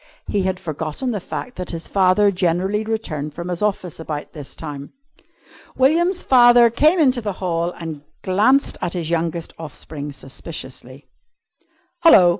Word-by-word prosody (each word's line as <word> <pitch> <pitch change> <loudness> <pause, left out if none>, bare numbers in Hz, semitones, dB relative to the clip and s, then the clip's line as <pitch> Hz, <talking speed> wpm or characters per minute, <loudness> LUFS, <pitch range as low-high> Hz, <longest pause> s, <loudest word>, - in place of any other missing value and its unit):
He 205 - 0
had 190 0 -1
forgotten 160 - -3
the 210 - -2
fact 250 +7 -6
that 180 -1 -5
his 165 -1 -5
father 195 +1 +4
generally 185 +3 0
returned 155 -10 -3
from 175 +1 -5
his 175 +1 -3
office 195 -6 -1
about 155 -2 -5
this 145 -3 -8
time. 145 -3 -8 0.8
William's 340 +7 +3
father 240 -2 +6
came 305 +9 +4
into 255 -5 +3
the 205 -3 -3
hall 170 -2 -1
and 160 -3 -7 0.2
glanced 220 +9 +2
at 175 - -2
his 170 -3 -3
youngest 165 0 -2
offspring 150 -1 -7
suspiciously. 135 -1 -8 0.9
"Hello!" 320 - +7
180 Hz, 145 wpm, -21 LUFS, 160-220 Hz, 0.9 s, Hello